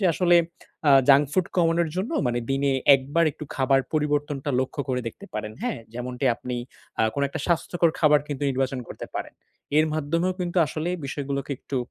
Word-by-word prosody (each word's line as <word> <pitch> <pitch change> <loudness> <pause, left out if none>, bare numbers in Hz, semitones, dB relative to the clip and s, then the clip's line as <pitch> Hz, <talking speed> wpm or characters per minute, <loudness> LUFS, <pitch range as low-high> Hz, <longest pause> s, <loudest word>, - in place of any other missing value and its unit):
যে - - 0
আসলে 175 0 +4 0.5
আ - - +8 0.2
junk 140 +1 +7
food 185 +1 +2
কমানোর 170 -1 +3
জন্য 195 - -2
মানে 120 0 0
দিনে 135 0 +1 0.2
একবার 145 +5 0
একটু 150 - -8
খাবার 135 0 +3
পরিবর্তনটা 145 -1 0
লক্ষ্য 130 +2 -3
করে 125 -1 0
দেখতে - - -13
পারেন। 105 0 -4
হ্যাঁ? - - -2 0.2
যেমনটি 125 +2 -4
আপনি 125 -1 -5 0.4
আ - - +4
কোনো 140 - +1
একটা 155 +3 -5
স্বাস্থ্যকর 170 0 +2
খাবার 150 -2 +5
কিন্তু 145 -1 -4
নির্বাচন 130 0 -1
করতে - - -7
পারেন। - - -5 0.4
এর 155 - +4
মাধ্যমেও 165 +4 0
কিন্তু 175 0 -1
আসলে 155 +3 -3 0.2
বিষয়গুলোকে 140 0 -4
একটু 140 - -5
145 Hz, 175 wpm, -25 LUFS, 135-165 Hz, 0.5 s, আ